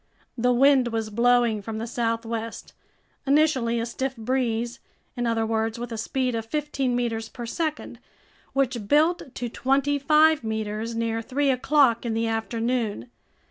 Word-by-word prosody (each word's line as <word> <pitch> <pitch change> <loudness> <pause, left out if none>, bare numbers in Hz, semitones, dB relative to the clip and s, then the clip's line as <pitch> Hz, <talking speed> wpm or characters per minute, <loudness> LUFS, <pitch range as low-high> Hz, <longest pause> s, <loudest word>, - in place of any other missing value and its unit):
The 245 +1 +2
wind 265 0 +5
was 225 -2 -3
blowing 235 -1 +3
from 220 +2 -5
the 225 - -3
southwest, 230 -1 -3 0.5
initially 270 -5 +3
a 230 - -1
stiff 265 +2 -3
breeze, 240 0 -1 0.4
in 245 -1 -1
other 225 -1 +1
words, 225 +1 -1
with 240 0 -6
a 225 - -4
speed 255 +2 -1
of 225 -1 -2
fifteen 275 -2 -1
meters 230 -2 -2
per 240 - -7
second, 310 +5 -3 0.5
which 255 -6 0
built 305 0 +2
to 245 - -3
twenty 275 +4 +1
five 305 +1 +4
meters 220 +1 -3
near 225 0 -1
three 275 +4 +1
o'clock 260 -2 +3
in 230 -2 -2
the 225 0 0
afternoon. 225 - -2
235 Hz, 150 wpm, -25 LUFS, 225-265 Hz, 0.5 s, wind